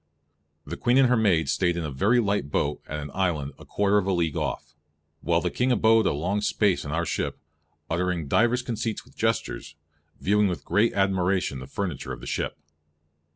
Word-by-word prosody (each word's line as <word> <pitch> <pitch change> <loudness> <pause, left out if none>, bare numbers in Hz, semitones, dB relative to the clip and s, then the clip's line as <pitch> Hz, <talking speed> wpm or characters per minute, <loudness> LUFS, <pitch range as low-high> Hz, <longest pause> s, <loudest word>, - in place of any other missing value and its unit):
The 85 +4 -6
Queene 120 +2 +2
and 135 -2 +5
her 125 - +4
maids 85 - +2
staied 85 +3 +1
in 85 - -2
a 75 - -4
very 105 - +2
light 100 - 0
boat 75 0 -1
at 75 - -4
an 75 -1 -7
island 80 -7 -1
a - - -12
quarter 105 0 +2
of 95 - -3
a - - +2
league 85 -4 0
off, - - -3 0.5
while 85 0 +1
the - - -1
King 125 +1 +1
abode 115 -3 +4
a - - +2
long 90 +8 -1
space 105 -2 +1
in 70 - -7
our 85 +2 0
ship, - - -2 0.5
uttering 85 -2 -1
divers 120 - +2
conceits 115 -2 -3
with - - -21
gestures, - - -2 0.4
viewing 105 +1 +3
with 90 -3 -4
great 110 +3 +2
admiration 95 -6 +1
the 65 - -9
furniture 90 -2 -4
of - - -8
the - - -10
shippe. - - -3
95 Hz, 200 wpm, -26 LUFS, 80-105 Hz, 0.5 s, and